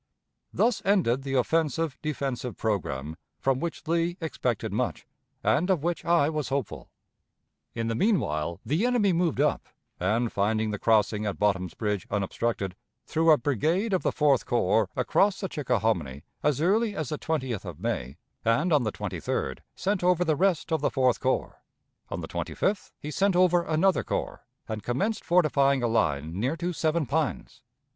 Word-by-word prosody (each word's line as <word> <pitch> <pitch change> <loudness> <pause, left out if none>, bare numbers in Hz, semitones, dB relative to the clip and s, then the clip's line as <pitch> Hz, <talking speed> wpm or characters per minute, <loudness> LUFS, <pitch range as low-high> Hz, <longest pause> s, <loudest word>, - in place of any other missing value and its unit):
Thus 235 -3 +1
ended 180 - +2
the 135 0 -3
offensive 160 +3 +1
defensive 135 -5 -3
programme 80 -8 -2 0.2
from 135 -1 +1
which 165 0 -5
Lee 170 +2 0
expected 130 - -2
much, - - -2 0.4
and 170 +8 +2
of 175 -6 +2
which 175 0 -1
I 170 -4 +3
was 155 -2 -2
hopeful. 135 -4 -3 0.9
In 115 -1 -2
the 115 - 0
mean 200 - +3
while 75 - -3
the 155 - +1
enemy 220 -6 +2
moved 170 -4 +1
up, 150 +1 +1 0.3
and, 110 +6 +1
finding 110 +2 +1
the 105 - -4
crossing 105 -1 +2
at 100 - -3
Bottom's 95 -4 0
Bridge 105 -4 -2
unobstructed, 100 -1 -2 0.3
threw 165 +1 +1
a 155 - +8
brigade 160 - 0
of 185 - +2
the - - +1
Fourth 145 -4 +3
Corps 110 -4 +2
across 200 0 +2
the 190 - -2
Chickahominy 90 - -1 0.2
as 150 -1 +1
early 210 +5 +2
as 155 -5 -3
the 150 - -3
20th 130 - -2
of 90 -6 -8
May, 65 +4 -3 0.3
and 150 +10 +2
on 150 - +5
the 110 -3 -1
23d 85 -10 -3 0.2
sent 195 -1 -1
over 180 0 +3
the 155 -2 +2
rest 180 0 +1
of 160 - +1
the - - +2
Fourth 130 -3 +2
Corps; 130 0 -1 0.5
on - - -4
the - - -6
25th 200 0 -2
he 150 - -6
sent 195 +4 +2
over 180 -1 +4
another 170 +3 +2
corps, - - -4 0.2
and 110 -1 -4
commenced 195 - -1
fortifying 140 -6 +3
a - - +3
line 80 -6 0
near 130 +9 0
to 175 +1 -2
Seven 160 0 0
Pines. 150 +1 -2
140 Hz, 170 wpm, -27 LUFS, 110-170 Hz, 0.9 s, a